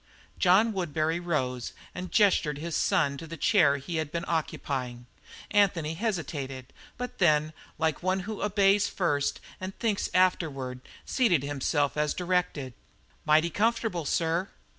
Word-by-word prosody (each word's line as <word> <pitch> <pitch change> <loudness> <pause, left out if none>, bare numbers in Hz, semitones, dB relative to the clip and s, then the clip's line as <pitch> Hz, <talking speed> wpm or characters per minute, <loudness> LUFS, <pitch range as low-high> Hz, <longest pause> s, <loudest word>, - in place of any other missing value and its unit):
John 200 +5 +4
Woodbury 165 -3 -1
rose 130 -8 -2 0.2
and 180 0 -6
gestured 185 -8 +3
his 165 +2 -4
son 155 -8 +2
to 165 - -8
the 165 +1 -7
chair 145 -5 +4
he 160 +5 -5
had 155 -2 -2
been 170 +1 -3
occupying. 130 -6 -3 0.5
Anthony 180 -7 +2
hesitated, 145 - -4 0.2
but 250 +1 -6
then, 155 -3 +3 0.2
like 160 -2 0
one 185 +1 0
who 210 +3 -6
obeys 200 0 +3
first 145 -6 0 0.2
and 185 +1 -6
thinks 215 -4 0
afterward, 145 -9 +1 0.3
seated 190 - +2
himself 145 +1 0
as 150 0 +1
directed. 180 -7 -1 0.5
"Mighty 155 +2 +4
comfortable, 220 -4 0
sir." 170 +5 0
165 Hz, 135 wpm, -28 LUFS, 145-190 Hz, 0.5 s, John